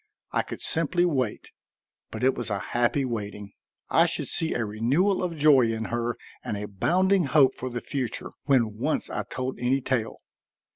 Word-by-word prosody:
I - - +2
could - - -8
simply 165 +2 +1
wait. 130 -10 -1 0.6
But - - -6
it 130 +1 +4
was 120 - -4
a 100 - 0
happy 120 +6 0
waiting. 105 -4 -5 0.3
I 165 +1 +4
should 160 -5 -3
see 165 -1 0
a 120 - 0
renewal 135 - +1
of 175 -3 -3
joy 140 -6 +5
in 110 0 -3
her 120 0 -1 0.3
and 105 - -3
a 105 +1 -4
bounding 185 - +2
hope 135 -2 +5
for 130 - -5
the 120 -1 -4
future 130 -4 -4
when 115 -7 +2
once 155 +6 -1
I - - -1
told 130 0 -5
any 125 +2 +2
tale. 125 -4 -2
130 Hz, 180 wpm, -26 LUFS, 115-155 Hz, 0.6 s, joy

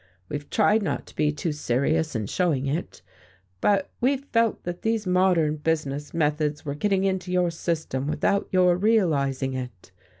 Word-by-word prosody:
We've 145 0 -5
tried 215 0 +3
not 195 - -2
to - - -16
be 150 -1 +2
too 150 +2 -3
serious 150 +2 0
in 110 -2 -1
showing 145 - 0
it, 150 +6 -4 0.6
but 195 -2 +2
we've 270 +2 +1
felt 230 -1 +2
that 175 0 -5
these 225 -1 0
modern 180 -4 +2
business 150 -2 -2
methods 150 -2 0
were 140 - -2
getting 195 +5 0
into 190 -1 -1
your 180 -1 +2
system 160 -5 -2
without 200 +6 0
your 180 -1 +4
realizing 145 - +1
it. 125 -8 -7
165 Hz, 160 wpm, -25 LUFS, 145-190 Hz, 0.6 s, your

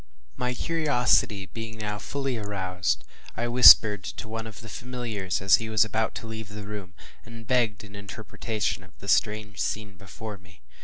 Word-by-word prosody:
My 125 0 -2
curiosity 125 -11 +2
being 110 +2 -8
now 105 -1 -4
fully 135 +1 -3
aroused, 95 -4 -2 0.3
I 120 +1 -1
whispered 110 -4 +8
to - - -6
one 115 +1 -5
of 110 +1 -10
the 115 - -10
familiars, 110 -8 -4
as 95 -3 +6
he 115 -1 -5
was 110 -1 +4
about 110 0 -1
to - - -6
leave 110 -2 -7
the 105 -1 -8
room, 100 -3 -8 0.3
and 115 0 -11
begged 115 -4 +1
an 100 0 -12
interpretation 105 -1 -4
of 90 0 -20
the 100 - -12
strange 105 -1 +1
scene 105 -1 -3
before 105 +1 -9
me. 90 -7 -20
110 Hz, 170 wpm, -26 LUFS, 100-115 Hz, 0.3 s, whispered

